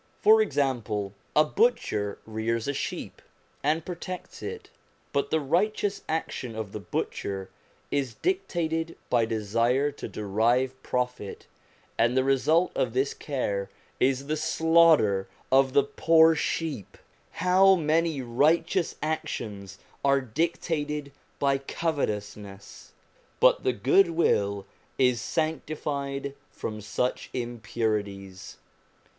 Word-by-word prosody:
For 435 Hz, +1 st, +6 dB
example, 115 Hz, -, -1 dB, 0.2 s
a 150 Hz, -, +7 dB
butcher 150 Hz, -, +1 dB
rears 110 Hz, +2 st, -2 dB
a 140 Hz, -, 0 dB
sheep, -, -, -5 dB, 0.4 s
and 155 Hz, +3 st, 0 dB
protects 180 Hz, 0 st, -7 dB
it; 455 Hz, -, -7 dB, 0.4 s
but 140 Hz, 0 st, 0 dB
this 160 Hz, -, +2 dB
righteous 195 Hz, +7 st, 0 dB
action 130 Hz, -7 st, -3 dB
of 110 Hz, -3 st, -5 dB
the 105 Hz, -, -5 dB
butcher 95 Hz, -1 st, -4 dB, 0.4 s
is 135 Hz, -5 st, -1 dB
dictated 165 Hz, -, -1 dB
by 120 Hz, -2 st, +4 dB
desire 115 Hz, +6 st, +1 dB
to 145 Hz, -, -7 dB
derive 115 Hz, +6 st, +1 dB
profit, 125 Hz, -5 st, -3 dB, 0.5 s
and 120 Hz, +3 st, +3 dB
the 130 Hz, -, +4 dB
result 145 Hz, +6 st, +3 dB
of 120 Hz, -3 st, -1 dB
this 135 Hz, +2 st, +1 dB
care 105 Hz, -9 st, -3 dB, 0.3 s
is 135 Hz, +1 st, +2 dB
the 155 Hz, +2 st, -1 dB
slaughter 160 Hz, -12 st, +4 dB, 0.2 s
of 135 Hz, 0 st, +4 dB
the 140 Hz, -, +5 dB
poor 160 Hz, +3 st, +5 dB
sheep. 150 Hz, -, -3 dB, 0.4 s
How 190 Hz, +2 st, +5 dB
many 160 Hz, -3 st, +1 dB
righteous 155 Hz, +8 st, +2 dB
actions 105 Hz, -10 st, -4 dB, 0.3 s
are 140 Hz, 0 st, +4 dB
dictated 150 Hz, +2 st, -2 dB, 0.3 s
by 140 Hz, -1 st, +2 dB
covetousness! 105 Hz, -, -4 dB, 0.5 s
But -, -, +5 dB
the 130 Hz, -, +2 dB
good 140 Hz, -, +4 dB
will 100 Hz, -, +1 dB, 0.3 s
is 125 Hz, -3 st, +3 dB
sanctified 145 Hz, -3 st, -2 dB, 0.2 s
from 110 Hz, -1 st, -6 dB
such 125 Hz, +4 st, -2 dB
impurities. 105 Hz, -5 st, -3 dB
135 Hz, 110 wpm, -27 LUFS, 110-160 Hz, 0.5 s, a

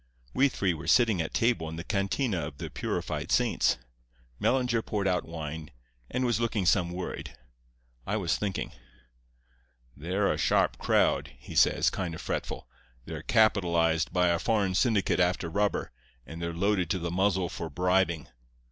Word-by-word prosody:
"We 140 Hz, +2 st, +4 dB
three 95 Hz, -7 st, 0 dB
were 80 Hz, -1 st, -8 dB
sitting 115 Hz, -8 st, +4 dB
at 80 Hz, -, -4 dB
table 115 Hz, -9 st, +1 dB
in 80 Hz, -, -6 dB
the 85 Hz, -, -5 dB
cantina 100 Hz, +2 st, 0 dB
of 70 Hz, -, -10 dB
the -, -, -6 dB
Purified -, -, -3 dB
Saints. -, -, +2 dB, 0.6 s
Mellinger 125 Hz, -3 st, +2 dB
poured 105 Hz, -3 st, -2 dB
out 90 Hz, -1 st, 0 dB
wine, 80 Hz, -1 st, -6 dB, 0.4 s
and 125 Hz, 0 st, -1 dB
was 120 Hz, -2 st, +1 dB
looking 115 Hz, -4 st, 0 dB
some 90 Hz, -1 st, +3 dB
worried; 90 Hz, -7 st, -6 dB, 0.7 s
I 105 Hz, -, 0 dB
was 85 Hz, -5 st, 0 dB
thinking. 100 Hz, -4 st, -3 dB, 1.2 s
"'They're 95 Hz, +7 st, 0 dB
a -, -, -5 dB
sharp -, -, +2 dB
crowd,' -, -, +2 dB
he -, -, -11 dB
says, -, -, +4 dB
kind 85 Hz, -4 st, -3 dB
of -, -, -8 dB
fretful. -, -, -4 dB, 0.4 s
'They're -, -, -6 dB
capitalized 85 Hz, -7 st, +2 dB
by 90 Hz, -1 st, +3 dB
a 85 Hz, -1 st, +2 dB
foreign 100 Hz, -3 st, +1 dB
syndicate 105 Hz, -2 st, +2 dB
after 90 Hz, -1 st, +1 dB
rubber, 100 Hz, +2 st, 0 dB, 0.3 s
and 80 Hz, +1 st, -8 dB
they're 85 Hz, 0 st, -2 dB
loaded 90 Hz, 0 st, 0 dB
to 95 Hz, -, +1 dB
the 85 Hz, -1 st, -3 dB
muzzle 95 Hz, 0 st, +1 dB
for 85 Hz, -1 st, -6 dB
bribing. 90 Hz, 0 st, +1 dB
90 Hz, 160 wpm, -28 LUFS, 85-105 Hz, 1.2 s, We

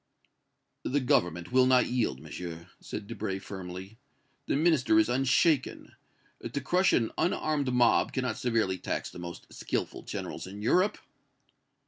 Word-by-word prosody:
"The 145 Hz, -, +1 dB
Government 90 Hz, -, +1 dB
will 130 Hz, 0 st, +5 dB
not 130 Hz, -1 st, +5 dB
yield, 115 Hz, -, -1 dB
Monsieur!" 85 Hz, 0 st, -8 dB
said 105 Hz, -, -6 dB
Debray, 95 Hz, -1 st, -4 dB
firmly. 95 Hz, +2 st, -8 dB, 0.5 s
"The -, -, +1 dB
Minister 155 Hz, 0 st, +3 dB
is 165 Hz, -, +5 dB
unshaken. 135 Hz, +3 st, +2 dB, 0.6 s
To -, -, 0 dB
crush 180 Hz, +8 st, +2 dB
an 115 Hz, -2 st, +2 dB
unarmed 150 Hz, -6 st, 0 dB
mob 120 Hz, -1 st, +3 dB
cannot 130 Hz, -3 st, -2 dB
severely 115 Hz, -8 st, 0 dB
tax -, -, -3 dB
the -, -, -10 dB
most 85 Hz, -1 st, -9 dB
skillful -, -, -3 dB
generals -, -, -6 dB
in 100 Hz, +2 st, -8 dB
Europe." 185 Hz, -, +3 dB
125 Hz, 135 wpm, -29 LUFS, 95-140 Hz, 0.6 s, will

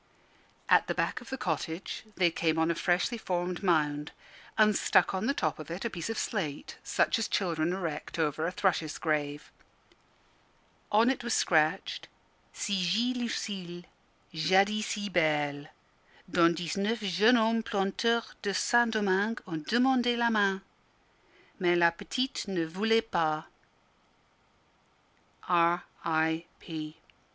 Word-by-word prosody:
At -, -, +4 dB
the -, -, -2 dB
back -, -, -1 dB
of 245 Hz, -, -12 dB
the 265 Hz, -, -4 dB
cottage 165 Hz, -, -4 dB
they 175 Hz, -2 st, +3 dB
came 165 Hz, -1 st, 0 dB
on 160 Hz, +1 st, +2 dB
a -, -, +1 dB
freshly 175 Hz, +7 st, 0 dB
formed 180 Hz, -3 st, -2 dB
mound, 150 Hz, -5 st, +1 dB, 0.5 s
and 215 Hz, -1 st, +5 dB
stuck -, -, +3 dB
on 190 Hz, +4 st, -1 dB
the 275 Hz, -, +2 dB
top 155 Hz, -2 st, -1 dB
of 155 Hz, -, -8 dB
it 175 Hz, +6 st, -5 dB
a 235 Hz, -, -2 dB
piece 170 Hz, +1 st, -5 dB
of 225 Hz, -, -3 dB
slate, 155 Hz, -10 st, -4 dB
such -, -, +1 dB
as 225 Hz, -, -1 dB
children 170 Hz, -3 st, 0 dB
erect 170 Hz, -6 st, -4 dB
over 155 Hz, 0 st, 0 dB
a -, -, -2 dB
thrush's 175 Hz, -5 st, 0 dB
grave. 145 Hz, -2 st, -2 dB, 1.4 s
On 225 Hz, +4 st, +5 dB
it 260 Hz, -, -4 dB
was 235 Hz, -1 st, 0 dB
scratched 155 Hz, -2 st, +1 dB, 0.4 s
Ci 205 Hz, -, -3 dB, 0.4 s
Git -, -, -10 dB
Lucille, 195 Hz, -7 st, -4 dB, 0.5 s
Jadis 195 Hz, +7 st, +2 dB
si 205 Hz, -3 st, -3 dB
Belle; 150 Hz, -5 st, 0 dB, 0.6 s
Dont 170 Hz, -2 st, +3 dB
dix 170 Hz, -2 st, -3 dB
neuf 215 Hz, +4 st, 0 dB
Jeunes 210 Hz, +5 st, +4 dB
Hommes, 225 Hz, 0 st, +2 dB
Planteurs 220 Hz, +4 st, 0 dB
de 200 Hz, -2 st, -2 dB
Saint 240 Hz, +3 st, +3 dB
Domingue. 205 Hz, +1 st, +1 dB
ont 160 Hz, -3 st, -5 dB
demande 245 Hz, 0 st, +3 dB
la 235 Hz, 0 st, +2 dB
Main. 200 Hz, -3 st, +2 dB, 1.0 s
Mais 175 Hz, -2 st, +3 dB
La 170 Hz, -1 st, +5 dB
Petite 255 Hz, +9 st, -3 dB
ne 180 Hz, -4 st, -1 dB
Voulait 220 Hz, +7 st, +2 dB
Pas. 155 Hz, -7 st, 0 dB, 2.0 s
R.I.P. 165 Hz, -2 st, -1 dB
180 Hz, 135 wpm, -29 LUFS, 160-215 Hz, 2.0 s, and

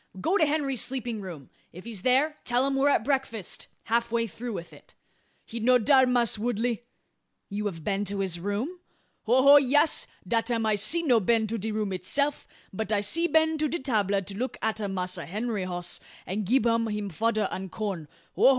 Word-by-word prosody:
"Go 335 Hz, -, +1 dB
to 315 Hz, -6 st, +4 dB
Henry's 285 Hz, -4 st, 0 dB
sleeping 245 Hz, -4 st, -2 dB
room. 170 Hz, -8 st, -9 dB, 0.2 s
If 180 Hz, +4 st, -12 dB
he's 225 Hz, -5 st, -3 dB
there, 270 Hz, +7 st, +3 dB
tell 245 Hz, +2 st, +2 dB
him 275 Hz, 0 st, 0 dB
we're 275 Hz, +1 st, +3 dB
at 255 Hz, -, +2 dB
breakfast 265 Hz, -8 st, -1 dB, 0.2 s
half 235 Hz, +1 st, +1 dB
through 230 Hz, 0 st, -3 dB
with 170 Hz, -3 st, -7 dB
it." -, -, -18 dB, 0.5 s
"He 235 Hz, -, -6 dB
no 250 Hz, +3 st, +5 dB
dar, 260 Hz, +2 st, +4 dB
Mass' 240 Hz, -3 st, +1 dB
Woodley." 235 Hz, +1 st, -1 dB, 0.6 s
"You 205 Hz, +1 st, -2 dB
have 165 Hz, -5 st, -6 dB
been 200 Hz, +3 st, 0 dB
to 200 Hz, +1 st, -2 dB
his 180 Hz, -3 st, -1 dB
room?" 210 Hz, -, -3 dB, 0.5 s
"Ho 250 Hz, +4 st, +4 dB
ho! 280 Hz, +1 st, +9 dB
Yas. 290 Hz, +3 st, +3 dB, 0.2 s
Dat 230 Hz, 0 st, 0 dB
am 230 Hz, -2 st, 0 dB
I'se 215 Hz, +6 st, +3 dB
no 250 Hz, -7 st, +4 dB
been 220 Hz, +2 st, +2 dB
to 225 Hz, +1 st, -3 dB
de 220 Hz, +3 st, -3 dB
room 210 Hz, -2 st, -2 dB
itseff; 280 Hz, -, -1 dB, 0.3 s
but 220 Hz, +3 st, -3 dB
I'se 215 Hz, +12 st, +1 dB
been 320 Hz, 0 st, +3 dB
to 305 Hz, -, +1 dB
de 335 Hz, -, -2 dB
'table, 205 Hz, -, 0 dB
to 195 Hz, +1 st, -8 dB
look 255 Hz, 0 st, -3 dB
atter 220 Hz, -1 st, -1 dB
Massa 180 Hz, -2 st, -3 dB
Henry 210 Hz, +1 st, -2 dB
hoss; 175 Hz, -1 st, -4 dB, 0.3 s
an 205 Hz, +2 st, -3 dB
gib 240 Hz, +4 st, +2 dB
um 230 Hz, -1 st, +2 dB
him 210 Hz, -2 st, -3 dB
fodder 215 Hz, +3 st, 0 dB
an 190 Hz, 0 st, -5 dB
corn. 190 Hz, -6 st, -4 dB, 0.3 s
Ho -, -, -6 dB
ho! -, -, +10 dB
225 Hz, 195 wpm, -27 LUFS, 200-260 Hz, 0.6 s, ho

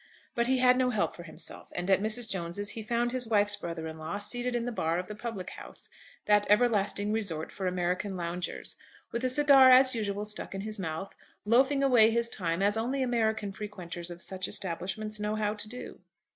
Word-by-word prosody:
But 235 Hz, 0 st, +1 dB
he 260 Hz, 0 st, +3 dB
had 250 Hz, 0 st, +5 dB
no 255 Hz, -1 st, +3 dB
help 215 Hz, -4 st, 0 dB
for -, -, -9 dB
himself, 170 Hz, -2 st, -8 dB
and 175 Hz, -, -3 dB
at 195 Hz, 0 st, +4 dB
Mrs. 220 Hz, +2 st, 0 dB
Jones's 190 Hz, +1 st, -3 dB
he 225 Hz, -, -5 dB
found 235 Hz, +2 st, 0 dB
his 250 Hz, -2 st, -2 dB
wife's 205 Hz, -2 st, +3 dB
brother 170 Hz, -4 st, -5 dB
in 160 Hz, 0 st, -7 dB
law 160 Hz, +6 st, -4 dB
seated 245 Hz, +4 st, -3 dB
in 235 Hz, -1 st, -1 dB
the 245 Hz, -, -2 dB
bar 165 Hz, -7 st, 0 dB
of 180 Hz, -, -2 dB
the 210 Hz, -, -6 dB
public 210 Hz, -4 st, -6 dB
house, -, -, -9 dB, 0.4 s
that 210 Hz, 0 st, +4 dB
everlasting 210 Hz, -2 st, +3 dB
resort 190 Hz, -8 st, -2 dB
for 190 Hz, -2 st, -3 dB
American 180 Hz, +2 st, -1 dB
loungers, 175 Hz, +1 st, -4 dB, 0.4 s
with 235 Hz, +2 st, -3 dB
a 255 Hz, -, +2 dB
cigar 275 Hz, -1 st, +7 dB
as 260 Hz, +1 st, +7 dB
usual 205 Hz, -2 st, -2 dB
stuck 210 Hz, -2 st, -6 dB
in 195 Hz, -, -3 dB
his 215 Hz, +1 st, -4 dB
mouth, 165 Hz, +2 st, -4 dB, 0.3 s
loafing 265 Hz, +5 st, +4 dB
away 240 Hz, -5 st, +6 dB
his 235 Hz, +1 st, +1 dB
time 175 Hz, -3 st, -1 dB
as 205 Hz, +2 st, +3 dB
only 260 Hz, +4 st, 0 dB
American 220 Hz, -4 st, 0 dB
frequenters 180 Hz, -4 st, -6 dB
of 175 Hz, 0 st, -8 dB
such 185 Hz, -1 st, -3 dB
establishments 195 Hz, +4 st, -3 dB
know 210 Hz, +1 st, -1 dB
how 210 Hz, -1 st, 0 dB
to 215 Hz, 0 st, -5 dB
do. 250 Hz, +2 st, -8 dB
210 Hz, 205 wpm, -29 LUFS, 185-235 Hz, 0.4 s, cigar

